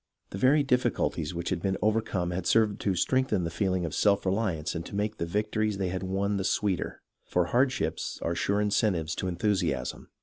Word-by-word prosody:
The 95 Hz, -, -5 dB
very 140 Hz, +5 st, +4 dB
difficulties 125 Hz, -, 0 dB
which 85 Hz, 0 st, -3 dB
had 90 Hz, -3 st, -1 dB
been 95 Hz, 0 st, 0 dB
overcome 105 Hz, -5 st, 0 dB
had 90 Hz, 0 st, -3 dB
served 110 Hz, -3 st, +3 dB
to 95 Hz, -2 st, +1 dB
strengthen 120 Hz, 0 st, +1 dB
the 85 Hz, -, -2 dB
feeling 95 Hz, 0 st, 0 dB
of 80 Hz, -, -4 dB
self 100 Hz, +5 st, +2 dB
reliance 95 Hz, -5 st, 0 dB
and 85 Hz, -, -4 dB
to -, -, -8 dB
make 105 Hz, +2 st, -1 dB
the 85 Hz, -, -2 dB
victories 105 Hz, +2 st, 0 dB
they 95 Hz, -2 st, -1 dB
had 90 Hz, 0 st, -3 dB
won 100 Hz, +2 st, -1 dB
the 95 Hz, -, -1 dB
sweeter, 100 Hz, -2 st, -1 dB, 0.2 s
for 90 Hz, -1 st, +1 dB
hardships 120 Hz, -, 0 dB
are 85 Hz, -, 0 dB
sure 100 Hz, +4 st, 0 dB
incentives 100 Hz, -6 st, +1 dB
to 95 Hz, -, -2 dB
enthusiasm. 90 Hz, -7 st, -1 dB
95 Hz, 195 wpm, -28 LUFS, 85-105 Hz, 0.2 s, very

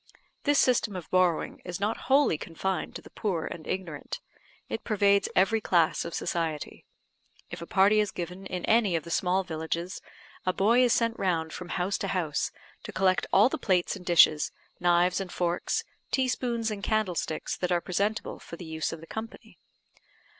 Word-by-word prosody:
This 290 Hz, -1 st, +4 dB
system 235 Hz, -5 st, +3 dB
of 180 Hz, -3 st, -7 dB
borrowing 180 Hz, -3 st, +1 dB
is 180 Hz, +1 st, -5 dB
not 210 Hz, +3 st, 0 dB
wholly 275 Hz, -, +5 dB
confined 175 Hz, +4 st, -3 dB
to -, -, -7 dB
the -, -, -14 dB
poor 180 Hz, -7 st, -2 dB
and 165 Hz, -2 st, -7 dB
ignorant; 170 Hz, -6 st, -4 dB, 0.5 s
it -, -, -4 dB
pervades 200 Hz, -2 st, +3 dB
every 220 Hz, +4 st, +3 dB
class 170 Hz, -5 st, +2 dB
of 170 Hz, -, -5 dB
society. 165 Hz, -4 st, -3 dB, 0.7 s
If -, -, -6 dB
a 170 Hz, -, -7 dB
party 200 Hz, +2 st, +4 dB
is 210 Hz, -1 st, +2 dB
given 180 Hz, +2 st, -6 dB
in 180 Hz, -1 st, -4 dB
any 220 Hz, -5 st, +3 dB
of 160 Hz, -, -1 dB
the 170 Hz, -, -8 dB
small 185 Hz, +2 st, +1 dB
villages, 165 Hz, +1 st, -4 dB, 0.4 s
a 185 Hz, -, +1 dB
boy 225 Hz, +7 st, +4 dB
is 245 Hz, -, +3 dB
sent 230 Hz, 0 st, +1 dB
round 165 Hz, -4 st, 0 dB
from 180 Hz, -1 st, -7 dB
house 190 Hz, +2 st, -1 dB
to 195 Hz, -, -2 dB
house, 175 Hz, -6 st, -1 dB, 0.3 s
to -, -, -8 dB
collect 185 Hz, -1 st, +2 dB
all 200 Hz, +4 st, +6 dB
the 315 Hz, +4 st, -3 dB
plates 185 Hz, -6 st, +1 dB
and 190 Hz, -, -10 dB
dishes, 165 Hz, -3 st, +5 dB, 0.3 s
knives 175 Hz, +1 st, +3 dB
and 185 Hz, -2 st, -6 dB
forks, 175 Hz, -, -1 dB, 0.3 s
teaspoons 245 Hz, -3 st, 0 dB
and 205 Hz, -1 st, -5 dB
candlesticks, 195 Hz, -7 st, -1 dB
that 180 Hz, 0 st, -2 dB
are 175 Hz, -, +3 dB
presentable, 200 Hz, +5 st, -2 dB
for -, -, -9 dB
the 175 Hz, -, -9 dB
use 160 Hz, 0 st, -2 dB
of 165 Hz, -, -7 dB
the -, -, -10 dB
company. 220 Hz, +5 st, -8 dB
185 Hz, 180 wpm, -28 LUFS, 170-210 Hz, 0.7 s, all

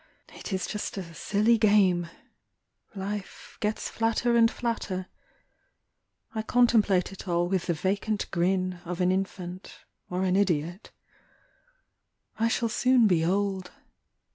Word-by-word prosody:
It -, -, -8 dB
is 190 Hz, -1 st, -1 dB
just 210 Hz, -1 st, -4 dB
a 170 Hz, -3 st, -6 dB
silly 215 Hz, +7 st, +2 dB
game. 190 Hz, -5 st, +3 dB, 0.9 s
Life 200 Hz, +1 st, -6 dB
gets 210 Hz, +1 st, -1 dB
flatter 230 Hz, +1 st, +1 dB
and 230 Hz, -1 st, +6 dB
flatter. 220 Hz, -7 st, -3 dB, 1.3 s
I 220 Hz, -, -2 dB
contemplate 220 Hz, -6 st, +3 dB
it 195 Hz, 0 st, -10 dB
all 175 Hz, 0 st, +1 dB
with 185 Hz, -1 st, -1 dB
the 170 Hz, -, +1 dB
vacant 200 Hz, +5 st, -1 dB
grin 185 Hz, 0 st, 0 dB
Of 180 Hz, +1 st, -5 dB
an 180 Hz, 0 st, +3 dB
infant 185 Hz, -1 st, -4 dB, 0.3 s
or 180 Hz, +1 st, -1 dB
an 185 Hz, -1 st, +2 dB
idiot. 175 Hz, -1 st, 0 dB, 1.5 s
I 230 Hz, -, +3 dB
shall 230 Hz, +1 st, 0 dB
soon 250 Hz, +1 st, +3 dB
be 175 Hz, -6 st, +3 dB
old. 190 Hz, +1 st, 0 dB
195 Hz, 125 wpm, -27 LUFS, 180-215 Hz, 1.5 s, and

